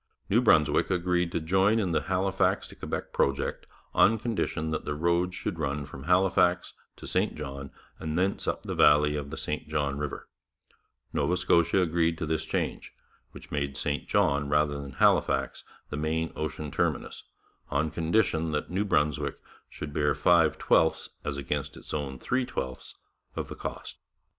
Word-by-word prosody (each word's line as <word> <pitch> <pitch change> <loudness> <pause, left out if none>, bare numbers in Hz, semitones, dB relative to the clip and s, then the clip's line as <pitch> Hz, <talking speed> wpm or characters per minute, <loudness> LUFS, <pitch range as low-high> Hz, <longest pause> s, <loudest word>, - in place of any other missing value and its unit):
New 115 +4 +5
Brunswick 80 - +4
agreed 90 -1 +1
to - - 0
join 95 +7 +3
in 95 -6 0
the 80 - +1
Halifax 95 +1 +1
to - - -12
Quebec - - -5
project 70 0 0 0.3
on 110 - +5
condition 100 -8 -2
that 80 - -2
the 75 - -3
road 85 +3 +1
should - - -4
run 70 +1 -2
from 70 -1 -10
Halifax 90 0 +3 0.2
to - - -11
St - - 0
John 70 -2 -6 0.3
and 80 0 -3
thence 95 +2 0
up - - -1
the - - -4
valley 75 0 +5
of 70 -1 -4
the 80 - -6
St 75 0 -4
John 70 -2 -1
river; 75 -1 -5 0.9
Nova 90 +2 +1
Scotia 85 +1 +3
agreed 85 -1 +1
to 80 - -3
this 80 0 -1
change, - - -3 0.3
which - - -13
made 70 -2 -2
St 75 0 -2
John 70 0 +2
rather 75 -1 +1
than 70 -2 -8
Halifax - - +2 0.3
the 75 - -3
main 80 +2 -1
ocean 75 -1 -4
terminus, - - -1 0.5
on 75 +2 0
condition 80 -2 +1
that 75 - -2
New 95 +3 0
Brunswick 75 -6 0 0.3
should 75 -1 -7
bear 75 0 +1
five 85 -3 +4
twelfths 80 0 +2
as 70 -1 -3
against 70 - -3
its - - -9
own 70 -3 -3
three 130 - -1
twelfths 65 - -5 0.4
of - - -4
the - - -6
cost. - - -6
80 Hz, 165 wpm, -28 LUFS, 75-90 Hz, 0.9 s, New